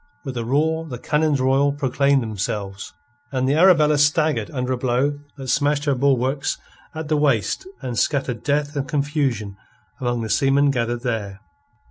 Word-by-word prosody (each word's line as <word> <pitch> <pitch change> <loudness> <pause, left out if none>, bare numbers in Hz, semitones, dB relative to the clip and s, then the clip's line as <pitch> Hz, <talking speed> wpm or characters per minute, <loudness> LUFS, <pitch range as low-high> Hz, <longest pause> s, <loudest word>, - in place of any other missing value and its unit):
With 135 -2 -5
a 120 - -2
roar 160 +6 0
the 125 - -5
cannons 150 +2 +1
royal 135 +2 +2
proclaimed 140 -1 +1
themselves, 100 -2 -4 0.4
and 130 -1 0
the 135 - +2
Arabella 155 -3 +5
staggered 155 +1 +2
under 130 -4 -2
a - - -2
blow 130 +4 0 0.2
that 135 -1 -7
smashed 145 +1 +1
her 140 - +2
bulwarks 135 +1 +1 0.4
at 160 -1 -5
the 155 0 +1
waist 140 - +1 0.2
and 120 -2 -2
scattered 130 -6 0
death 145 +1 -1
and 140 -1 -2
confusion 140 -9 -1 0.4
among 120 -2 -1
the 110 - -4
seamen 140 0 +3
gathered 120 -1 -2
there. 105 -5 -3
135 Hz, 160 wpm, -22 LUFS, 120-145 Hz, 0.4 s, Arabella